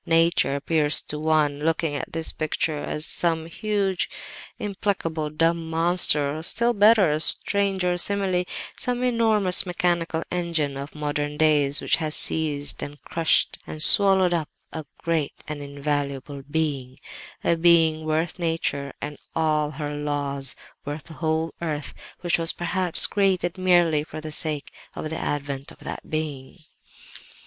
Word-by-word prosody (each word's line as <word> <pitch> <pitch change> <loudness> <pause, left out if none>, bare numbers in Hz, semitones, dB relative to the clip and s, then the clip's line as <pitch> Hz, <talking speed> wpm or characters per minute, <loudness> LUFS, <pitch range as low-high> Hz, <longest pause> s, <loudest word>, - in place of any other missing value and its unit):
Nature 165 -4 +2
appears 150 +1 +1
to 150 - -7
one, 155 -2 +1
looking 160 0 0
at - - -4
this 165 0 -2
picture, 155 0 -2
as 150 +1 -3
some 165 -2 -1
huge, 195 +1 -2 0.5
implacable, 190 -6 -3
dumb 165 +1 0
monster; 160 -3 +4
or - - -7
still 235 +8 +1
better—a 205 -7 +4
stranger 190 +1 +1
simile—some 200 +6 -2
enormous 220 -6 +3
mechanical 175 -2 -1
engine 170 -5 -1
of 140 +3 -8
modern 145 0 -3
days 150 -2 +5
which - - +2
has 155 -2 -3
seized 145 -3 0
and 145 0 -7
crushed 165 -1 +1
and 155 0 +3
swallowed 190 -3 +5
up 160 -3 -2 0.2
a 160 - -5 0.2
great 160 -3 -1
and 150 -1 -5
invaluable 140 -1 -4
Being, 145 -4 -2 0.5
a 170 - +2
Being 165 -2 +4
worth 160 +3 -2
nature 160 -5 -2
and 145 0 -6 0.2
all 155 -2 +1
her 150 0 -5
laws, 145 -2 -1 0.3
worth 145 +1 -6
the 165 - -12
whole 160 +1 -2
earth, 155 -3 -4 0.3
which 175 -1 +2
was 165 0 -1
perhaps 175 0 +6
created 190 -3 0
merely 175 -5 +3
for 155 - -9
the 155 0 -7
sake 150 -1 -3 0.2
of 155 - -5
the 160 - -4
advent 140 -1 -4
of - - -15
that - - -8
Being. 150 -2 -5
160 Hz, 140 wpm, -24 LUFS, 145-175 Hz, 0.5 s, perhaps